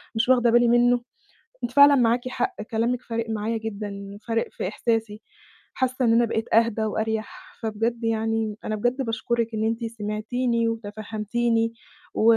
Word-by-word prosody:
مش 225 +3 +1
واخدة 245 -2 +5
بالي 240 0 +5
منه. 240 +1 +4 0.6
أنتِ 240 - -2
فعلًا 285 +1 +8
معاكِ 245 0 +2
حق، 380 +8 -2
كلامكِ 235 +3 -1
فارق 230 -1 -4
معايا 220 +1 -1
جدًا، 200 -2 -6
فارق 230 0 0
في - - -4
إحساسي. 220 0 -1 0.5
حاسة 260 0 0
إن 230 - +4
أنا 235 +1 +5
بقيت 225 0 -2
أهدى 225 -1 +3
وأريح، 220 - -4
فبجد 225 +2 -2
يعني 225 -1 0
أنا 215 - -2
بجد 245 +5 0
باشكرِك 230 0 -1
إن 220 0 -1
أنتِ 230 +1 -1
سمعتِني 230 +2 -1
وتفهّمتِني 225 +1 -1 0.4
و - - 0
230 Hz, 150 wpm, -25 LUFS, 220-240 Hz, 0.6 s, فعلًا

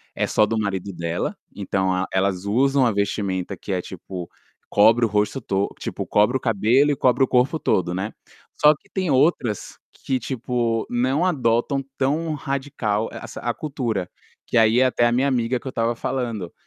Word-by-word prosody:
é - - 0
só 110 - +3
do 110 +2 -2
marido 100 -2 -2
dela, 85 0 -3 0.2
então 95 -1 -1
a 90 +1 0
elas 95 0 0
usam 135 +5 +3
a 120 - +3
vestimenta 100 -2 -2
que 100 - -7
é 90 -1 0
tipo, 90 -1 -8 0.4
cobre 115 +3 +5
o - - +1
rosto 105 +5 0
to 100 -2 0
tipo, - - -4
cobre 105 +5 +3
o - - -10
cabelo 120 +6 +3
e - - +1
cobre 130 0 +3
o - - +3
corpo 130 +6 +2
todo, 90 - +1
né. 95 +4 -3 0.5
Só 150 +1 +7
que - - -26
tem 185 -3 -2
outras 135 - +1
que, 130 -1 -3
tipo, 120 -2 -1
não 130 +7 +1
adotam 135 -4 +1
tão 150 +5 0
radical 135 -7 -2
essa - - -8
a 120 0 -1
cultura, 120 - -3 0.4
que - - -5
aí 115 +1 +5
é 130 - +5
até 125 -2 +2
a - - +1
minha 130 +3 +2
amiga 125 -2 0
que - - -23
eu - - -2
estava 115 -1 -1
falando, 115 -8 -3
115 Hz, 185 wpm, -23 LUFS, 100-130 Hz, 0.5 s, Só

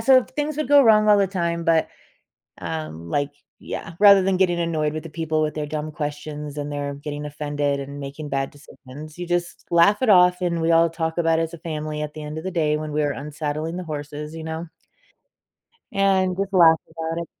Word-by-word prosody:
so 260 +3 +6
if 255 - -3
things 295 +3 -3
would 305 -4 -2
go 285 0 +7
wrong 215 -3 +5
all 205 - +6
the 200 - +3
time, 170 -3 -2
but, 165 -1 +3 0.7
um, 85 - -6
like 145 +5 0 0.3
Yeah, 170 - -6
rather 200 -2 +8
than 190 -1 +1
getting 175 -2 +2
annoyed 160 -3 0
with 155 - -5
the 165 - -8
people 160 0 -1
with 150 - -1
their 150 -1 -4
dumb 155 +1 -4
questions, 150 0 -5
and 145 0 -4
their 145 -1 -3
getting 145 +1 -6
offended, 145 -1 -2
and 140 +1 -7
making 140 +2 -7
bad 135 -1 -1
decisions, 145 +2 -12
you 175 - -4
just 175 0 -2
laugh 170 +6 +4
it 255 - +2
off, 180 -1 +6
and 170 -2 0
we 165 +1 +2
all 165 0 +5
talk 160 0 -3
about 165 -1 +3
it - - +1
as 165 +1 -5
a - - -7
family 155 -2 -4
at 150 0 -5
the 155 - -7
end 150 +1 -6
of - - -9
the 190 - -3
day 155 -4 +1
when 155 0 -5
we 150 +1 0
are 145 - +1
unsaddling 150 +3 -4
the 185 - -4
horses, 150 0 -6
you 160 - -7
know 160 +1 -4 1.3
and 190 -2 +2
just 195 0 -2
laugh 165 -3 +6
about 165 +1 -4
it. - - -12
160 Hz, 225 wpm, -23 LUFS, 150-175 Hz, 1.3 s, rather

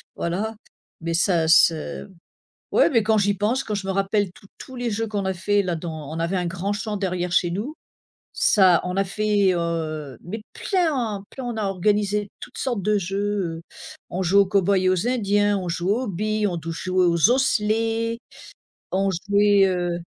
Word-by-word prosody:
voilà, 205 +6 -2 0.5
mais 165 0 -2
ça 170 -1 +2
se 165 +2 +3 0.6
ouais - - +4
mais 230 -5 +3
quand 220 0 +2
j'y 200 0 +2
pense, 220 +7 0
quand 210 - -3
je 195 -1 -4
me 195 - +1
rappelle 195 0 0
tous 195 - -18
tous 260 - -10
les 245 0 -2
jeux 225 +1 -2
qu'on 205 -2 -2
a 190 0 -1
fait 205 +3 +1
là 175 -2 -1
dans 155 -3 -6
on 165 - -4
avait 170 +3 -1
un 180 -1 -1
grand 185 +3 -2
champ 210 0 -3
derrière 180 -2 -2
chez 175 - +2
nous, 215 - -4 0.6
ça 185 -4 +4
on 180 - -3
n'a 195 +1 +1
fait, 205 0 +1
heu, 155 -6 -3
mais 210 +5 -6
plein, 265 - -1
plein 265 - -8
on 240 -2 -4
a 210 - -1
organisé 205 +2 0
toutes - - -10
sortes 240 -6 -2
de 210 0 +2
jeux, 195 -2 -2
heu, - - -13 0.5
on 185 +2 -2
jouait 195 +3 +4
aux - - -6
cow-boys 195 0 +2
et 185 0 +2
aux 185 +6 +1
indiens, 205 -4 +2
on 180 -2 -4
joue 175 +2 -2
aux 250 +1 -2
billes, 215 +3 -1
on 175 -3 -2
touchait 165 +3 -5
aux 180 +2 +4
osselets, 230 -2 +1 0.7
on 195 +1 +1
jouait, 200 +2 +3
heu 175 -1 -1
195 Hz, 190 wpm, -23 LUFS, 175-215 Hz, 0.7 s, ouais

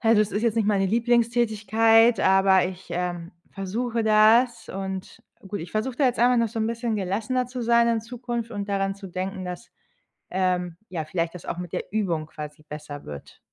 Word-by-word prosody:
also, 225 -2 +4
es 210 - -5
ist 205 - -1
jetzt 230 -3 +2
nicht 220 -3 +2
meine 195 -2 +2
Lieblingstätigkeit, 225 0 +3
aber 190 -1 +4
ich, 185 0 -8
ähm, 175 -1 -3 0.2
versuche 225 +4 -2
das 220 +3 +4
und 190 0 -6 0.3
gut, 205 +1 -4
ich 165 +1 -9
versuche 230 +4 -2
da 285 - +2
jetzt 250 -2 +1
einfach 245 +1 +5
noch 230 -1 +2
so 225 +1 -4
'n 220 - +1
bisschen 230 0 -2
gelassener 215 +6 -1
zu 250 0 -5
sein 235 0 +4
in 230 -1 +1
Zukunft 235 0 -5
und 205 -1 -4
daran 195 -1 0
zu 195 -1 -10
denken, 185 +1 -4
dass, 180 +5 -7 0.6
ähm, 180 -2 0
ja, 165 -4 -4
vielleicht 165 +2 -2
das 180 - -10
auch - - -4
mit 180 -2 -6
der - - -2
Übung 175 -8 -1
quasi 150 -1 -9
besser 150 -1 -8
wird. 75 -1 -10
205 Hz, 195 wpm, -25 LUFS, 185-230 Hz, 0.6 s, einfach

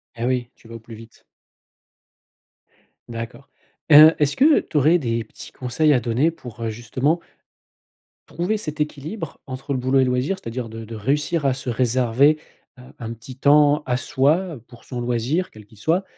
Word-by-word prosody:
Et 115 0 -3
oui. 125 -1 -1
Tu - - -20
vas 115 - -10
au - - -8
plus 115 +1 -12
vite. 115 +1 -16 1.9
D'accord. 115 +4 -8 0.4
Heu, 155 +2 +10
est-ce 145 -1 +1
que 295 +3 +5
tu 155 - -4
aurais 155 +5 +5
des 115 -6 -2
petits - - -12
conseils 130 +5 0
à 125 - +3
donner 125 +7 +1
pour, 120 -8 -12
heu, 115 - -1
justement 125 +8 -1 1.1
trouver 180 +6 -2
cet 155 -7 -6
équilibre 150 +3 -5
entre 135 +2 -5
le 130 - -1
boulot 130 +2 +1
et - - +5
loisir. 130 +9 0
C'est-à-dire 115 -3 -6
de 115 0 -8
de 115 - -10
réussir 145 +6 0
à 130 - +1
se 130 - -10
réserver, 125 +5 +2 0.4
heu, - - -13 0.2
un 115 -1 -5
petit 115 +3 -11
temps 145 +1 +4
à 125 - +1
soi 155 +7 0
pour 120 -2 -16
son 125 -2 -6
loisir, 125 +9 -1
quel 110 -1 -14
qu'il 105 +1 -21
soit. 165 - +1
130 Hz, 180 wpm, -22 LUFS, 115-150 Hz, 1.9 s, Heu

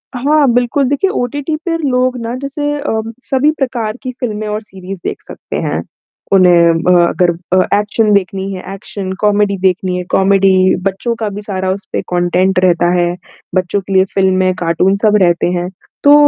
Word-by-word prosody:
हाँ, 290 +3 +2
बिल्कुल 245 +3 +1
देखिए 285 +7 +1
ओटीटी 285 +5 -2
पे 340 -2 0
लोग 255 -4 0
ना 230 +1 -4
जैसे 290 +1 -3
अम, 225 -6 -3
सभी 270 +2 +2
प्रकार 240 -4 -2
की 255 - -3
फ़िल्में 215 -3 -3
और 210 0 -3
सीरीज़ 190 -3 -9
देख - - -3
सकते - - -9
हैं। - - -2 0.5
उन्हें 170 -3 +5
ब 180 - +3 0.2
अगर 180 -1 +2
अ, 180 +3 0
एक्शन 210 +1 +1
देखनी 195 0 -1
है 185 +1 -7
एक्शन, 195 -1 -6
कॉमेडी 205 -1 +2
देखनी 185 -1 0
है 180 - -3
कॉमेडी, 190 -1 +3
बच्चों 195 +5 -1
का 220 -2 -1
भी 205 +1 -7
सारा 190 -2 -3
उस 195 0 -4
पे - - 0
कॉन्टेंट 180 +2 +2
रहता 175 -1 +3
है। 175 0 +1 0.4
बच्चों 185 +2 0
के 195 +1 -6
लिए 190 0 +4
फिल्में, 185 -1 +2
कार्टून 180 +3 +1
सब 210 -1 +4
रहते 175 -1 +2
हैं, 175 +1 -3 0.3
तो 290 0 +7
195 Hz, 175 wpm, -14 LUFS, 185-240 Hz, 0.5 s, तो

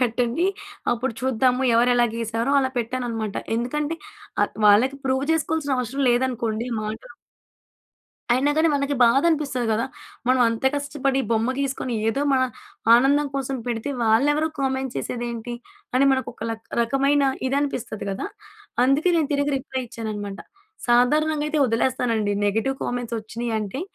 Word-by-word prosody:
పెట్టండి. 245 +6 +1 0.5
అప్పుడు 240 +1 -2
చూద్దాము. 255 0 +2
ఎవరు 240 +2 +4
ఎలా 240 0 +4
గీసారో" 230 +3 -1
అలా 260 - 0
పెట్టానన్నమాట. 230 -3 -3 0.2
ఎందుకంటే 295 +6 -1 0.5
ఆహ్, - - 0
వాళ్ళకి 240 +7 +5
ప్రూవ్ 265 +1 +1
చేసుకోవాల్సిన 315 -3 0
అవసరం 250 +3 -2
లేదనుకోండి. 240 -2 0
మా 215 - -4 1.5
అయినా 265 +4 +3
గానీ 320 +1 +4
మనకి 280 0 0
బాధనిపిస్తది 275 0 +3
గదా! 220 +2 +1 0.4
మనం 255 0 +4
అంత 230 +1 -3
కష్టపడి 280 -2 -1
బొమ్మ 225 +2 +2
గీసుకొని 265 -3 -2
ఏదో 275 +6 0
మన 260 -1 +3 0.5
ఆనందం 280 +4 +4
కోసం 270 0 -2
పెడితే 235 +3 -2
వాళ్ళెవరో 290 +8 +3
కామెంట్స్ 265 -1 -1
చేసేదేంటి? 240 0 -4 0.4
అని 275 - +4
మనకు 260 0 -1
ఒక - - -25
లా 225 - -2 0.2
రకమైన 275 +4 +2 0.3
ఇదనిపిస్తది 260 -7 -2
కదా! 195 - -3 0.6
అందుకే 280 +7 +3
నేను 310 -4 +1
తిరిగి 285 0 +1
రిప్లై 260 -1 -4
ఇచ్చానన్నమాట. 210 -3 -5 0.5
సాధారణంగా 295 +6 +3
అయితే 310 - 0
వదిలేస్తానండి 230 -3 0
నెగెటివ్ 225 +6 0
కామెంట్స్ 245 -1 -3
వచ్చినయంటే 220 - -3
255 Hz, 130 wpm, -23 LUFS, 230-275 Hz, 1.5 s, వాళ్ళకి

